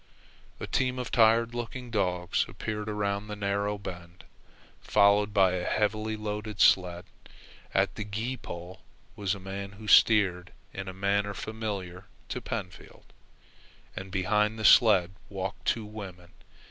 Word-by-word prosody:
A - - -4
team 130 -1 0
of 125 - -4
tired 115 0 +4
looking 120 +1 -6
dogs 90 -4 0
appeared 105 +3 -4
around 100 -1 -2
the 105 - -5
narrow 100 0 -1
bend, 90 -2 -9 0.6
followed 100 +1 +3
by 95 -3 +4
a 90 -1 -2
heavily 110 +2 0
loaded 105 -1 -5
sled. 90 -2 +4 0.7
At - - +1
the 105 - -5
gee 110 +5 -3
pole 90 -5 -9 0.3
was 100 -1 -1
a - - -9
man 100 +1 -6
who 105 +2 -11
steered 100 -5 +4 0.2
in 95 0 -6
a - - -4
manner 100 +1 0
familiar 100 -5 -5 0.2
to - - -4
Pentfield, - - -7 0.8
and 95 0 -6
behind 105 +3 +1
the 110 - -3
sled 95 -6 +6 0.2
walked 95 0 -5
two 115 -2 +1
women. 95 -5 -9
100 Hz, 140 wpm, -28 LUFS, 95-110 Hz, 0.8 s, sled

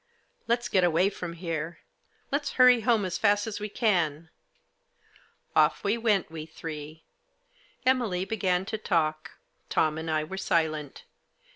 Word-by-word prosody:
" - - -42
Let's 240 +1 +1
get 190 -2 +2
away 175 +3 +3
from 180 -3 -6
here; 165 -1 -4 0.5
let's 285 +1 -1
hurry 250 -2 +6
home 225 -4 +2
as 185 - -3
fast 205 -1 +3
as 220 -2 -5
we 210 0 -4
can." 170 -8 0 1.2
Off - - +3
we 200 +2 +2
went, 215 -7 +1
we 160 -1 -7
three. 155 -1 -8 0.8
Emily 235 -8 +1
began 190 -4 0
to 220 - -4
talk. 160 -5 -1 0.4
Tom 155 0 +1
and 160 0 -5
I 155 -1 +1
were 190 +5 -7
silent. 155 -5 -1
180 Hz, 145 wpm, -27 LUFS, 160-215 Hz, 1.2 s, hurry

